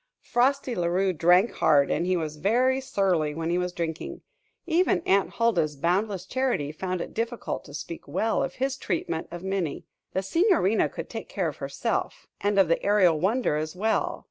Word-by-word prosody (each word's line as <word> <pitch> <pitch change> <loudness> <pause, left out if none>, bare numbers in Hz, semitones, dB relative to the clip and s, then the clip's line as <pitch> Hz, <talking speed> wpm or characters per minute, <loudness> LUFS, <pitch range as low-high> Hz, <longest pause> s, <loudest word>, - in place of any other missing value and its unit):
Frosty 265 +1 +1
La 175 -5 0
Rue 185 +2 +1
drank 180 +6 +4
hard, 145 -3 +3
and 175 - 0
he 185 0 +2
was 155 -2 -4
very 250 - +2
surly 180 - 0
when 165 +1 -2
he 175 - +1
was 180 0 -1
drinking. 165 -2 -4 0.4
Even 350 +2 +2
Aunt 195 0 +2
Huldah's 175 -11 +1
boundless 180 +5 0
charity 250 - -1
found 180 +2 -3
it - - -6
difficult 230 +1 -3
to 145 - -12
speak 165 +3 -7
well 225 +1 0
of - - -3
his 265 +1 -1
treatment 165 -7 -3
of 175 +1 -8
Minnie. 190 -6 -2 0.3
The 190 - -1
Signorina 325 - +2
could - - -7
take - - -7
care - - -1
of - - -9
herself - - -3
and 205 0 0
of 195 -3 +5
the 165 - +1
Aerial 190 -6 +4
Wonder 200 -2 +1
as 155 +2 -4
well. 220 +4 0
185 Hz, 185 wpm, -26 LUFS, 165-225 Hz, 0.4 s, of